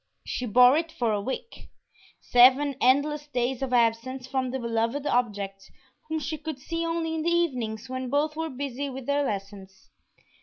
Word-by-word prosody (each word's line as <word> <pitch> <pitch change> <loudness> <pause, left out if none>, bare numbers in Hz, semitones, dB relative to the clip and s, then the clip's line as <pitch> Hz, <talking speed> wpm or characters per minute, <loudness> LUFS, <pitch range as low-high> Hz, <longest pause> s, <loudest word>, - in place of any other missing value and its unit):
She 250 - -3
bore 250 +5 +6
it 325 0 -2
for 235 -6 -1
a 205 - -1
week 265 - -6 0.5
seven 265 +3 +5
endless 290 +3 +2
days 255 -1 -1
of 265 -2 -2
absence 245 +2 +1
from 260 -1 -2
the 260 - -2
beloved 235 +3 -1
object, 205 -7 -1 0.4
whom 315 - -1
she 305 +1 -4
could 310 -2 -5
see 330 +5 -4
only 330 -1 -1
in 320 - -2
the 335 - +1
evenings 250 -11 -1
when 255 0 -4
both 295 +3 0
were 320 0 -3
busy 280 0 -4
with 265 -1 -7
their 285 +1 +1
lessons. 195 -4 -6
260 Hz, 175 wpm, -26 LUFS, 235-295 Hz, 0.5 s, bore